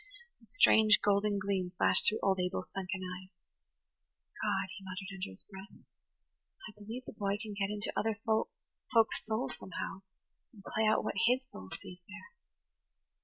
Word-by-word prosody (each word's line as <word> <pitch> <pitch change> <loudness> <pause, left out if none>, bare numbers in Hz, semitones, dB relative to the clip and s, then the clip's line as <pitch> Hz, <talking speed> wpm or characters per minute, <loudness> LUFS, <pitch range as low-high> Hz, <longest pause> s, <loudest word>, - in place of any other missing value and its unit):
The - - -18
strange, 220 - +6
golden 205 0 +2
gleam 195 -2 -1
flashed - - +5
through 215 - -1
old 190 -1 +3
Abel's 180 0 -2
sunken 190 0 -3
eyes. 185 0 -6 1.1
"God," 185 - 0
he 195 - -10
muttered 190 +1 -6
under 185 - -4
his 95 - -3
breath, 195 0 -12 0.8
"I - - -9
believe 220 +5 -7
the - - -8
boy 200 -1 -1
can 215 -2 -6
get 200 -1 -1
into 210 0 -2
other 220 -1 0
folk's 225 - 0
souls 220 -12 -1
somehow, 190 +1 -5 0.5
and 205 -4 -15
play 220 +2 0
out 215 - +3
what - - -1
his 250 +2 +4
soul 95 0 -9
sees 180 - -8
there." 340 - -11
200 Hz, 160 wpm, -33 LUFS, 190-220 Hz, 1.1 s, strange